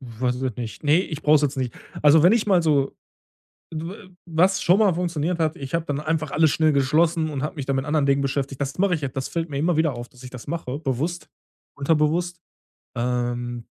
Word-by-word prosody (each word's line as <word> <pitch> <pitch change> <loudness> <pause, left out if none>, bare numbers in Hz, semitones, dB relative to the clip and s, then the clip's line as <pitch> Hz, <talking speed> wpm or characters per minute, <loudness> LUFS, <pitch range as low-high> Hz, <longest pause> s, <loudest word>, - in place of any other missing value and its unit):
weiß 125 0 -3
ich 130 - -6
jetzt 130 -4 -2
nicht. 110 -4 -6
Ne, 155 +3 +4
ich 155 -5 -5
brauche 150 +1 +5
es 150 - 0
jetzt 145 -1 0
nicht. 125 -3 -2 0.3
Also, 150 +1 +6
wenn 180 - +7
ich 225 -2 +2
mal 185 -4 +4
so 145 -4 +2 0.8
dw 180 +5 -7 0.2
was 175 +3 +2
schon 180 +4 +4
mal 205 -5 +4
funktioniert 170 -1 -2
hat, 160 0 +1
ich 135 -1 -8
habe 165 0 0
dann 145 -2 -2
einfach 155 -1 -2
alles 155 0 +3
schnell 155 0 +3
geschlossen 155 +4 +2
und 140 -3 -4
habe 150 - -3
mich 140 -3 -5
da 140 - -1
mit 135 0 -1
anderen 150 -1 +1
Dingen 140 0 +2
beschäftigt, 135 0 -2
das 140 +4 -3
mache 190 -2 +3
ich 155 - -5
jetzt, 140 -2 -4
das 130 - -2
fällt 165 -1 -3
mir 140 - -4
immer 165 +4 +1
wieder 160 -4 +2
auf, 120 0 -7
dass 125 0 -17
ich 125 - -8
das 125 -2 -10
mache, 145 -4 -4
bewusst, 155 +5 -3 0.5
unterbewusst. 165 +4 +1 0.6
Ähm, 120 0 -2
150 Hz, 230 wpm, -23 LUFS, 135-165 Hz, 0.8 s, wenn